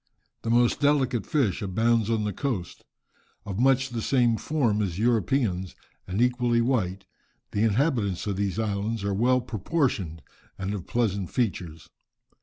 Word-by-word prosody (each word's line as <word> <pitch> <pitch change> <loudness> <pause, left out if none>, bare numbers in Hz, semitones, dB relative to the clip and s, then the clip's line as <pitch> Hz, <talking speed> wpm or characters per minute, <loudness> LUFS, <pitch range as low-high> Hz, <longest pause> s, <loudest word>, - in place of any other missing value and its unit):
The 115 - -4
most 120 +1 +3
delicate 135 -5 +2
fish 135 - +1
abounds 110 +3 +1
on 110 -2 +1
the 105 -1 -2
coast. 115 -11 -4 0.6
Of 100 -1 -4
much 130 +1 +3
the 120 -2 -4
same 120 -2 +3
form 115 -6 0
as 90 -4 -2
Europeans, 110 -4 +1 0.3
and 95 +3 -2
equally 125 -1 +2
white, 100 -6 0 0.5
the 100 - -1
inhabitants 110 - +1
of 100 -2 -1
these 100 -1 -1
islands 105 0 -2
are 100 0 0
well 125 +5 +3
proportioned 105 - -2 0.3
and 95 +1 -3
of 100 -4 -6
pleasant 100 -6 0
features. 90 -9 -2
110 Hz, 145 wpm, -26 LUFS, 100-125 Hz, 0.6 s, most